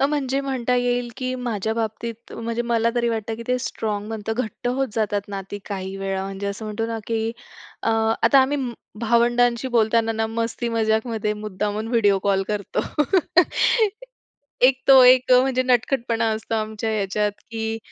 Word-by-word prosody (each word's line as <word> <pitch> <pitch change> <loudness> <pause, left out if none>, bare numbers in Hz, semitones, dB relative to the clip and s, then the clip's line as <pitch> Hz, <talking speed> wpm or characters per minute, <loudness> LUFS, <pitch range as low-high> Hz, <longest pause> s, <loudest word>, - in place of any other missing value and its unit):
अ, 275 - +4
म्हणजे 275 -2 -1
म्हणता 255 -3 -1
येईल, 245 0 0
की 255 -1 -3
माझ्या 220 -3 -2
बाबतीत 230 +1 -5
म्हणजे 230 +1 -3
मला 230 -1 +1
तरी 235 -1 +1
वाटतं 225 -1 -2
की 235 - -7
ते 250 - +2
स्ट्राँग 210 -3 -3
बनतं, 220 0 -3
घट्ट 245 0 -4
होत 265 +2 0
जातात 205 -2 -1
नाती 195 0 -6
काही 190 -1 -4
वेळा 195 0 -3
म्हणजे 195 +1 -5
असं 200 +2 -4
म्हणतो 215 +1 -3
ना, 230 0 -3
की 225 -1 -1 0.5
अ, - - 0 0.3
आता 250 +4 +6
आम्ही 280 +2 +1 0.4
भावंडांशी 240 +2 +2
बोलताना 225 -1 +2
ना, 220 0 -1
मस्ती 230 +1 -3
मजाकमध्ये 220 -1 0
मुद्दामून 210 +1 -3
व्हिडिओ 205 -5 +3
कॉल 195 -1 +2
करतो. 205 -2 -2 1.8
एक 260 +1 +5
तो 265 -1 +9
एक 255 0 +6
म्हणजे 255 0 +4
नटखटपणा 240 -2 +1
असतो 220 +1 -4
आमच्या 220 0 -2
ह्याच्यात, 210 0 0 0.2
की 225 0 -3
225 Hz, 155 wpm, -23 LUFS, 215-245 Hz, 1.8 s, तो